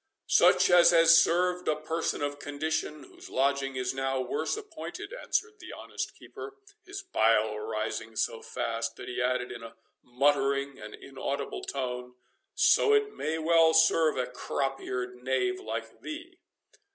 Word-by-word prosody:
"Such -, -, +5 dB
as 175 Hz, -1 st, +7 dB
has 165 Hz, -1 st, +7 dB
served 180 Hz, +1 st, +1 dB
a 155 Hz, -, +2 dB
person 155 Hz, 0 st, -2 dB
of 145 Hz, 0 st, -3 dB
condition, 150 Hz, +1 st, -3 dB
whose -, -, -14 dB
lodging 135 Hz, 0 st, 0 dB
is 125 Hz, 0 st, -2 dB
now 135 Hz, 0 st, -1 dB
worse 130 Hz, -, -2 dB
appointed," 430 Hz, +3 st, -8 dB
answered 440 Hz, -3 st, -2 dB
the -, -, -10 dB
honest -, -, -6 dB
keeper, 420 Hz, -1 st, -10 dB, 0.3 s
his 395 Hz, +1 st, -8 dB
bile 110 Hz, -, +2 dB
rising 110 Hz, +1 st, -4 dB
so 115 Hz, +1 st, -1 dB
fast 115 Hz, 0 st, -3 dB
that -, -, -10 dB
he 125 Hz, -, -3 dB
added, 125 Hz, 0 st, 0 dB
in -, -, -8 dB
a 115 Hz, 0 st, -10 dB, 0.3 s
muttering 140 Hz, +1 st, +1 dB
and 105 Hz, 0 st, -9 dB
inaudible 140 Hz, +1 st, -5 dB
tone, 125 Hz, -2 st, -4 dB, 0.4 s
"so 440 Hz, 0 st, +4 dB
it 425 Hz, 0 st, +1 dB
may 155 Hz, +1 st, -2 dB
well 165 Hz, 0 st, +4 dB
serve 160 Hz, -1 st, +4 dB
a 125 Hz, -, 0 dB
crop 135 Hz, +2 st, -3 dB
eared 125 Hz, 0 st, -5 dB
knave 130 Hz, -, 0 dB
like 390 Hz, -, -6 dB
thee." 335 Hz, +4 st, -8 dB
140 Hz, 150 wpm, -29 LUFS, 125-170 Hz, 0.4 s, as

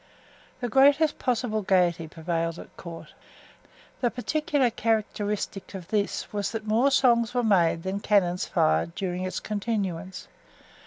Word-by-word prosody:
The 245 Hz, -, -1 dB
greatest 280 Hz, +5 st, +4 dB
possible 240 Hz, -4 st, 0 dB
gayety 180 Hz, -4 st, +2 dB
prevailed 165 Hz, +1 st, -3 dB
at -, -, -12 dB
court. 170 Hz, -2 st, -10 dB, 0.9 s
The 245 Hz, -, +2 dB
particular 290 Hz, +1 st, 0 dB
characteristic 210 Hz, -3 st, -2 dB
of 180 Hz, -3 st, -8 dB
this 210 Hz, -1 st, -1 dB
was 205 Hz, -1 st, -1 dB
that 220 Hz, -1 st, -4 dB
more 225 Hz, +6 st, +3 dB
songs 240 Hz, -3 st, +3 dB
were 245 Hz, -, +2 dB
made 170 Hz, -6 st, +3 dB
than 190 Hz, +1 st, -2 dB
cannons 185 Hz, -4 st, +2 dB
fired 80 Hz, -, +1 dB
during 185 Hz, -1 st, -3 dB
its 185 Hz, -, -3 dB
continuance. 195 Hz, -4 st, -3 dB
205 Hz, 130 wpm, -26 LUFS, 180-235 Hz, 0.9 s, greatest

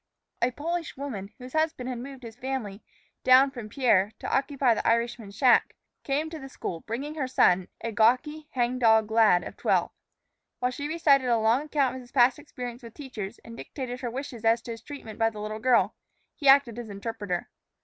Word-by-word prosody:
A 240 Hz, -, +3 dB
Polish 330 Hz, +5 st, -4 dB
woman, 220 Hz, -8 st, -6 dB
whose 250 Hz, 0 st, -11 dB
husband 315 Hz, -5 st, 0 dB
had 250 Hz, -2 st, -4 dB
moved 265 Hz, +1 st, -9 dB
his 225 Hz, -1 st, -9 dB
family 245 Hz, -6 st, -4 dB, 0.4 s
down 260 Hz, +2 st, +6 dB
from 240 Hz, -5 st, -8 dB
Pierre 210 Hz, -5 st, +2 dB
to -, -, -2 dB
occupy 270 Hz, -3 st, +2 dB
the -, -, -2 dB
Irishman's 230 Hz, -3 st, 0 dB
shack, 255 Hz, 0 st, +4 dB, 0.3 s
came 290 Hz, +3 st, -1 dB
to 320 Hz, -, -6 dB
the 270 Hz, -1 st, -9 dB
school, 170 Hz, -9 st, -5 dB
bringing 260 Hz, -, -5 dB
her 290 Hz, -4 st, -2 dB
son, 180 Hz, -7 st, +3 dB
a 230 Hz, -, -3 dB
gawky, 255 Hz, +8 st, +2 dB
hangdog 235 Hz, -3 st, +3 dB
lad 220 Hz, -6 st, +5 dB
of -, -, -8 dB
twelve. -, -, +1 dB, 0.7 s
While 250 Hz, 0 st, 0 dB
she 285 Hz, +3 st, -4 dB
recited 295 Hz, -5 st, +3 dB
a 235 Hz, -, +4 dB
long 225 Hz, +4 st, +3 dB
account 290 Hz, -4 st, 0 dB
of -, -, -8 dB
his 245 Hz, 0 st, -16 dB
past 250 Hz, +1 st, +4 dB
experiences 245 Hz, -4 st, -7 dB
with 230 Hz, -, -11 dB
teachers, 235 Hz, -7 st, -7 dB
and 230 Hz, -, -10 dB
dictated 250 Hz, 0 st, -6 dB
her 245 Hz, -, -2 dB
wishes 250 Hz, -2 st, -6 dB
as 225 Hz, +1 st, +3 dB
to 235 Hz, -, -6 dB
his 225 Hz, -, -7 dB
treatment 235 Hz, -7 st, -9 dB
by 225 Hz, 0 st, +3 dB
the 215 Hz, -2 st, -10 dB
little 215 Hz, +1 st, -5 dB
girl, 225 Hz, -4 st, +3 dB, 0.4 s
he 285 Hz, -, -3 dB
acted 270 Hz, -4 st, +5 dB
as 235 Hz, -2 st, -7 dB
interpreter. 200 Hz, -3 st, -4 dB
245 Hz, 195 wpm, -27 LUFS, 225-270 Hz, 0.7 s, down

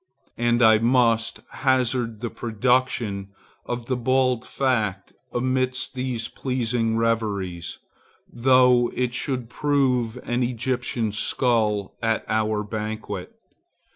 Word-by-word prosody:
And 120 Hz, 0 st, +3 dB
I 110 Hz, -1 st, +7 dB
must 115 Hz, -1 st, +2 dB
hazard 125 Hz, -4 st, 0 dB
the 120 Hz, -, -3 dB
production 120 Hz, -3 st, 0 dB, 0.4 s
of 120 Hz, -1 st, -3 dB
the 130 Hz, -, -1 dB
bald 125 Hz, 0 st, +1 dB
fact 110 Hz, -8 st, -1 dB, 0.2 s
amidst 130 Hz, +1 st, -1 dB
these 125 Hz, -3 st, -3 dB
pleasing 120 Hz, -3 st, -1 dB
reveries, 105 Hz, -7 st, -1 dB, 0.5 s
though 125 Hz, 0 st, +4 dB
it 125 Hz, -1 st, -1 dB
should 125 Hz, -2 st, -2 dB
prove 125 Hz, -4 st, +1 dB
an 120 Hz, +1 st, -1 dB
Egyptian 120 Hz, -2 st, -1 dB
skull 105 Hz, -2 st, 0 dB
at 115 Hz, -1 st, 0 dB
our 110 Hz, -1 st, 0 dB
banquet. 105 Hz, -3 st, -5 dB
120 Hz, 105 wpm, -24 LUFS, 110-125 Hz, 0.5 s, I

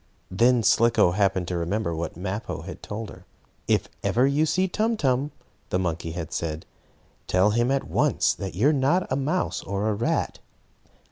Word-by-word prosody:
Then 120 Hz, +5 st, +3 dB
Slicko 115 Hz, -5 st, +4 dB
happened 95 Hz, -2 st, +1 dB
to 90 Hz, -, -1 dB
remember 85 Hz, +2 st, -1 dB
what 80 Hz, 0 st, -4 dB
Mappo 95 Hz, +4 st, -4 dB
had -, -, -8 dB
told 105 Hz, +1 st, -6 dB
her. 90 Hz, -, -13 dB, 0.4 s
"If -, -, +2 dB
ever 125 Hz, +3 st, +2 dB
you 145 Hz, +3 st, +2 dB
see 185 Hz, +5 st, +1 dB
Tum 220 Hz, +4 st, 0 dB
Tum," 135 Hz, -3 st, +1 dB, 0.4 s
the -, -, +1 dB
monkey 85 Hz, -2 st, -2 dB
had 85 Hz, -1 st, -5 dB
said, 80 Hz, -2 st, -3 dB, 0.6 s
"tell 95 Hz, +3 st, +3 dB
him 120 Hz, +3 st, +1 dB
at 135 Hz, 0 st, +1 dB
once -, -, +1 dB
that 95 Hz, -3 st, -6 dB
you 115 Hz, +10 st, +4 dB
are -, -, +3 dB
not 145 Hz, +7 st, +2 dB
a -, -, +2 dB
mouse 150 Hz, +7 st, -1 dB
or 100 Hz, +2 st, -2 dB
a -, -, +1 dB
rat." 110 Hz, +4 st, -1 dB
105 Hz, 180 wpm, -25 LUFS, 90-135 Hz, 0.6 s, Slicko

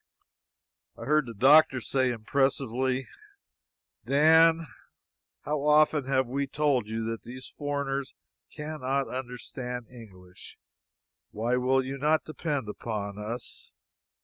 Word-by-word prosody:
I -, -, -8 dB
heard 150 Hz, -2 st, +2 dB
the 115 Hz, -, -8 dB
doctor 135 Hz, +4 st, +6 dB
say 130 Hz, +2 st, 0 dB
impressively: 130 Hz, +1 st, 0 dB, 1.0 s
"Dan, 160 Hz, +3 st, +5 dB, 0.8 s
how 150 Hz, -1 st, -2 dB
often 150 Hz, -1 st, +4 dB
have 130 Hz, 0 st, +1 dB
we 140 Hz, +3 st, -2 dB
told 140 Hz, -5 st, 0 dB
you 110 Hz, +1 st, -3 dB
that 115 Hz, 0 st, -4 dB
these 130 Hz, +2 st, -10 dB
foreigners 140 Hz, -2 st, -3 dB, 0.4 s
cannot 140 Hz, -3 st, -3 dB
understand 125 Hz, -1 st, -6 dB
English? 95 Hz, -7 st, -14 dB, 0.7 s
Why 115 Hz, +4 st, -1 dB
will 130 Hz, +1 st, +2 dB
you 135 Hz, +1 st, -5 dB
not 155 Hz, +2 st, +2 dB
depend 150 Hz, -5 st, -3 dB
upon 105 Hz, -1 st, -5 dB
us? 115 Hz, +3 st, -7 dB
130 Hz, 110 wpm, -28 LUFS, 120-145 Hz, 1.0 s, doctor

